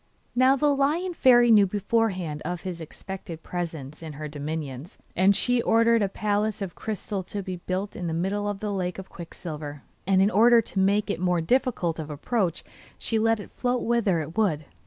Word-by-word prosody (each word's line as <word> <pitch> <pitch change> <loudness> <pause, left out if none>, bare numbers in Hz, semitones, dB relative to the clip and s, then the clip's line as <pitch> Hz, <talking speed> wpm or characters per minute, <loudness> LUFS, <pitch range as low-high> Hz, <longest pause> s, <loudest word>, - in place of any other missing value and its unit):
Now 255 +2 +5
the 290 +1 +2
Lion 315 +7 +1
Fairy 240 -6 +5
knew 205 -3 +7
beforehand 190 -6 -1
of 175 +1 -4
his 180 -3 -5
expected 165 0 -8
presence 160 -5 -5
in 160 -2 -7
her 150 +2 -6
dominions, 150 +1 -6 0.2
and 190 +2 +4
she 245 +3 +2
ordered 230 0 +4
a 200 - +1
palace 210 +1 -1
of 195 -4 -4
crystal 210 -2 -4
to 200 +1 -5
be 185 -1 -5
built 185 +3 -4
in 175 - -4
the - - -2
middle 200 +4 -1
of 205 -1 -5
the 210 -1 -2
lake 180 -2 -2
of 190 -1 -8
quicksilver; 150 -4 -8 0.2
and 195 -1 +4
in 195 +2 +4
order 235 +4 +6
to 205 -3 -3
make 200 +2 +2
it - - -3
more 180 -1 +1
difficult 175 -4 0
of 155 -1 -5
approach 175 - -1 0.3
she 225 - -1
let 225 0 +2
it 205 - -10
float 250 0 -1
whither 220 -8 +1
it 160 +2 -7
would. 170 -9 +1
195 Hz, 195 wpm, -26 LUFS, 170-225 Hz, 0.3 s, knew